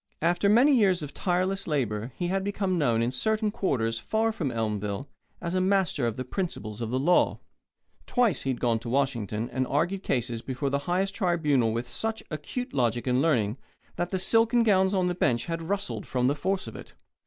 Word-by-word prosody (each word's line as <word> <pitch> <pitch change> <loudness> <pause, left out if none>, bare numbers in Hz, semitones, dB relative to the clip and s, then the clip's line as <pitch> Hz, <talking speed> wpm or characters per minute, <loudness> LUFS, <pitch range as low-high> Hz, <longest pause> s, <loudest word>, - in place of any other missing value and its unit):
After 175 +4 +2
many 255 +7 +6
years 190 -8 +3
of 145 - -7
tireless 185 +2 -1
labour 120 -6 -1
he 175 -1 -2
had 190 +1 0
become 195 -2 -1
known 115 -6 +2
in 120 - 0
certain 215 - 0
quarters 115 - -1
far 220 - 0
from 175 -11 -2
Elmville 105 +1 -2 0.3
as 170 - -4
a 185 - +2
master 185 -9 +1
of 115 - -3
the 130 - -4
principles 120 - -4
of 115 - -2
the 125 - 0
law. 170 +7 +3 0.7
Twice 245 -7 +2
he 135 - -3
had 130 - -1
gone 115 -2 +1
to 115 - -7
Washington 120 -5 -1
and 130 +1 -1
argued 175 +7 0
cases 120 - -1
before 135 +2 -3
the 140 - +1
highest 190 +2 +1
tribunal 150 - +2
with 115 +2 -3
such 220 - -3
acute 245 - -5
logic 120 -2 0
and 125 0 +2
learning 125 -7 +1 0.4
that 175 0 -2
the 190 - -1
silken 225 +5 +4
gowns 190 -2 +3
on 185 -1 +2
the 180 - 0
bench 120 -9 +1
had 165 -1 -3
rustled 200 0 -2
from 125 -1 0
the 135 - +3
force 190 +6 -1
of - - -9
it. - - -11
155 Hz, 200 wpm, -27 LUFS, 120-195 Hz, 0.7 s, many